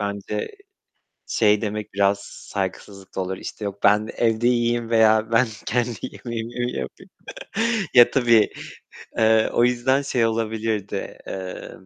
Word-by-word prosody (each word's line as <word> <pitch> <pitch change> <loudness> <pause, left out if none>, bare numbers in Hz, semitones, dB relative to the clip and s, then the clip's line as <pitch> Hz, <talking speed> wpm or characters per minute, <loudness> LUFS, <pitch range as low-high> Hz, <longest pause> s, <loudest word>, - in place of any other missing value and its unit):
bence 100 +1 -3 0.8
şey 105 -2 +3
demek 105 -1 -4
biraz 100 0 +2 0.3
saygısızlık 95 0 -5
da - - -1
olur. 95 0 -3
İşte, 105 - -7
yok 100 0 -5
ben 105 +1 +4
evde 115 0 +2
yiyeyim 120 -1 +1
veya 110 -1 +4
ben 125 +2 +4 0.2
kendi 120 -1 -1
yemeğimi 120 0 -6
mi 125 - -2
yapayım? - - -7 0.9
Ya, 120 -1 +8
tabii, 115 -4 +4 0.7
eee, 110 0 +4
o 120 - +3
yüzden 125 +3 +2
şey 125 -4 +1
olabilirdi, 110 -2 -3
eee, 95 -1 -6
110 Hz, 130 wpm, -23 LUFS, 100-120 Hz, 0.9 s, Ya